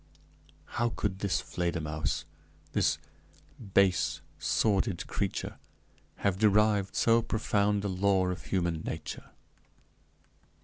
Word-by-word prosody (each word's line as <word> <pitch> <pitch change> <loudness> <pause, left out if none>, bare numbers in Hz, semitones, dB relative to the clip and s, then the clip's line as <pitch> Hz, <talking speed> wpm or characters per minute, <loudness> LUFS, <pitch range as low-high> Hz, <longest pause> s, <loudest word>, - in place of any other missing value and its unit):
How 120 - +3
could 95 -4 -2
this 100 -2 +1
Fledermausse, 80 -4 -2 0.5
this - - +2 0.8
base, 95 -2 +3 0.2
sordid 100 -3 +1
creature, - - -3 0.6
have 95 -2 0
derived 105 -2 +3
so 115 0 +4
profound 105 -2 +1
a - - +2
law 95 -1 +2
of 90 - -4
human 85 -4 0
nature? 80 -1 -6
100 Hz, 95 wpm, -30 LUFS, 90-105 Hz, 0.8 s, so